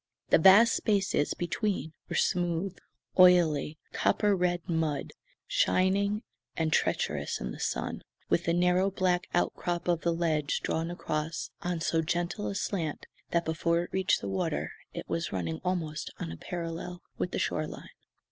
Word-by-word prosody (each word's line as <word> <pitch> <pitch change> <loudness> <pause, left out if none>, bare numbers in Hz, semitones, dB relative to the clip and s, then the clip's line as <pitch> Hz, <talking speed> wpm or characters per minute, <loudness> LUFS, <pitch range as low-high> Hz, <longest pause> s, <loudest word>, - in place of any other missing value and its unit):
The - - +6
vast 195 +7 +8
spaces 195 -8 +1
between 175 -1 -2 0.2
were - - -3
smooth, 175 +1 0 0.4
oily, 165 -5 +5 0.2
copper 205 -2 +2
red 175 -1 0
mud, 160 -4 -1 0.3
shining 200 - +2 0.3
and 160 -1 +1
treacherous - - 0
in - - -4
the - - -8
sun 60 -1 -2 0.3
with 175 - +1
the 170 - +2
narrow 180 +2 +3
black 185 -2 0
outcrop 175 0 -1
of 170 -2 +2
the 170 - +1
ledge 160 -3 0
drawn 165 +1 -1
across 155 -2 -3
on 175 -2 -2
so 165 0 +1
gentle 175 +5 -2
a 200 - -3
slant 175 -6 -2 0.2
that 170 0 +1
before 170 +1 +1
it - - -11
reached 190 0 +2
the - - -4
water 95 -1 -1 0.2
it - - -7
was 165 +1 -2
running 85 -4 -3
almost 165 -4 -2
on 80 - -4
a - - -6
parallel 175 - -5 0.2
with - - 0
the - - -3
shoreline. 155 0 -2
175 Hz, 155 wpm, -29 LUFS, 160-185 Hz, 0.4 s, vast